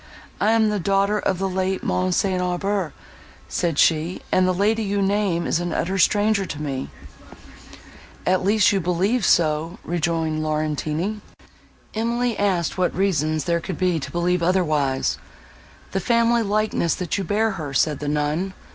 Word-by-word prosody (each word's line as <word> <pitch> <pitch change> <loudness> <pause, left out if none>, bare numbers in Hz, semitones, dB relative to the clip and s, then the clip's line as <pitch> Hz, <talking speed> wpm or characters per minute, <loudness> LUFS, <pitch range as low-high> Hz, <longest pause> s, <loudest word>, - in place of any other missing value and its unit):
"I 215 +2 +3
am 220 -1 +3
the 210 - -1
daughter 200 +3 +1
of 190 - 0
the 195 +1 -1
late 190 0 -1
Mons. 185 0 0
St. 185 -2 +1
Aubert," 180 -1 -1 0.6
said 170 -4 -1
she; 165 +4 +2
"and 185 0 +3
the - - +3
lady 210 +5 +1
you 205 -1 -1
name 195 -3 +1
is - - +1
an 175 0 -3
utter 185 +4 -1
stranger 205 +1 +3
to 155 -5 -6
me." 135 -3 -4 1.4
"At 185 0 +2
least 205 +1 +4
you 200 - +1
believe 190 +7 0
so," 165 0 +2
rejoined 165 -2 -1
Laurentini. 155 +5 -2 0.7
Emily 235 +1 0
asked 185 -3 0
what 180 - +1
reasons 155 -5 +1
there 170 +1 0
could 180 0 -5
be 180 -3 +1
to 135 - -6
believe 175 +1 0
otherwise. 155 -7 +1 0.7
"The 195 - 0
family 235 +3 +2
likeness, 210 -5 0
that 180 +2 -2
you - - -1
bear 215 +4 +1
her," 155 -7 -5
said 145 +2 +1
the 145 - -5
nun. 150 +6 -1
185 Hz, 160 wpm, -22 LUFS, 160-200 Hz, 1.4 s, least